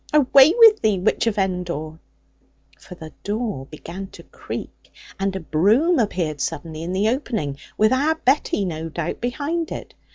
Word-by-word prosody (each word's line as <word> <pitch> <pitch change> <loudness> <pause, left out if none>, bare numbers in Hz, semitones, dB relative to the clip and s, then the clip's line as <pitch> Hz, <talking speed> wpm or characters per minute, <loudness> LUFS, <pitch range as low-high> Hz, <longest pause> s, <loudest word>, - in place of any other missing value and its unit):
Away 280 0 +6
with 450 -2 +7
thee, 215 -3 +2
witch 200 +4 0
of 220 - 0
Endor!' 175 -5 -3 0.8
For 180 - -12
the 160 -3 -11
door 205 - -3
began 175 +6 -8
to - - -12
creak, - - -9 0.3
and 195 0 -1
a - - -2
broom 215 - +2
appeared 170 - -1
suddenly 155 +1 -4
in 170 +2 -4
the 195 +3 +1
opening, 220 - -3 0.2
with 215 +3 +4
our 295 +5 +2
Betty, 265 -8 +1
no 165 -2 -4
doubt, 160 0 -4
behind 295 +7 -2
it. - - -7
195 Hz, 160 wpm, -22 LUFS, 165-260 Hz, 0.8 s, with